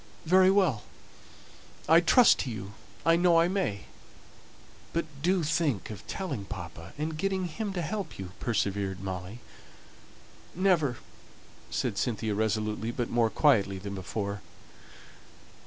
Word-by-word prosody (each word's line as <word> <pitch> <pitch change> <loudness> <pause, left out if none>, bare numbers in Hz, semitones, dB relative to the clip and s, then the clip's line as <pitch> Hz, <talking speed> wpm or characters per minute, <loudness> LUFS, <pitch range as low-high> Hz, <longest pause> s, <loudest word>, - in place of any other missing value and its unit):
"Very 185 +3 +6
well. 185 - +3 1.1
I 165 +1 +7
trust 225 +8 +6
to 130 - -2
you. 105 -3 -6 0.3
I 165 0 +6
know 170 -1 +4
I 165 - +4
may." 180 - -1 1.1
"But 170 0 0 0.2
do 180 +2 +2
think 145 - 0
of 105 - -10
telling 150 - -4
papa, 85 -3 -8
and 155 +2 -3
getting 190 0 0
him 200 +5 -4
to 175 -2 -2
help 190 0 -4
you," 95 -2 -7
persevered 100 -5 -1
Molly. 95 +4 -6 1.1
"Never," 170 -9 +2 0.7
said - - -1
Cynthia, 110 -2 -1
resolutely, 110 +1 -1
but 120 0 -3
more 115 -1 +3
quietly 105 -9 +3
than 100 +1 -6
before. 100 +1 -4
120 Hz, 125 wpm, -29 LUFS, -, 1.1 s, I